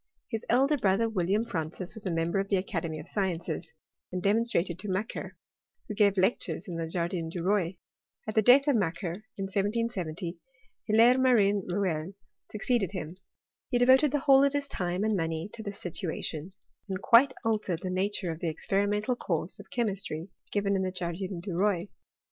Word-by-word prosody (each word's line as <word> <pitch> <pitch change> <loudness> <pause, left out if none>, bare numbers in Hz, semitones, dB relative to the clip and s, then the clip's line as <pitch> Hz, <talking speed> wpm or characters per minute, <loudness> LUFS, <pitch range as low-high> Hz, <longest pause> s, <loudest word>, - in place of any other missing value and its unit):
His 225 0 -2
elder 275 +5 +4
brother, 215 -1 +2
William 200 0 +1
Francis, 175 -4 -4
was 210 -3 -6
a - - 0
member 165 +3 0
of 195 0 -2
the 195 - +3
Academy 165 -5 -3
of 150 - -9
Sciences, 185 -5 -3 0.4
and 180 - -2
demonstrator 200 -3 +2
to 185 +5 -8
Macquer, 195 +4 -3 0.5
who 215 - -4
gave 200 -1 +3
lectures 185 -4 +1
in 175 - -5
the 165 -1 -3
Jardin 170 0 -2
du 170 0 -4
Roi. 185 -2 +1 0.5
At 215 - -2
the 220 - +4
death 260 +6 +6
of 285 - +4
Macquer, 175 -4 -1 0.2
in 195 - -3
1770, 195 -4 -2 0.5
Hilaire 230 +4 +5
Marin 205 -7 +3
Rouelle 180 -2 -1 0.4
succeeded 215 -2 0
him. 165 -4 -5 0.6
He 245 - +2
devoted 260 +4 +6
the 290 -1 0
whole 275 0 +6
of 280 0 +3
his 285 -1 -1
time 180 -4 -2
and 220 -1 +2
money 165 +2 -2
to 225 - -7
this 200 -2 -6
situation, 165 -2 -4 0.4
and 190 -1 -2
quite 245 +6 +6
altered 210 -6 0
the 185 - -2
nature 190 -1 -1
of 160 - -6
the 170 - -1
experimental 205 +7 0
course 170 -5 -3
of 205 - -12
che 240 - 0
mistry 190 -5 -3 0.2
given 200 -1 +1
in 190 - +1
the 185 -1 -1
Jardin 180 0 -4
du 190 0 -5
Roi. 195 0 +1
195 Hz, 180 wpm, -29 LUFS, 175-220 Hz, 0.6 s, death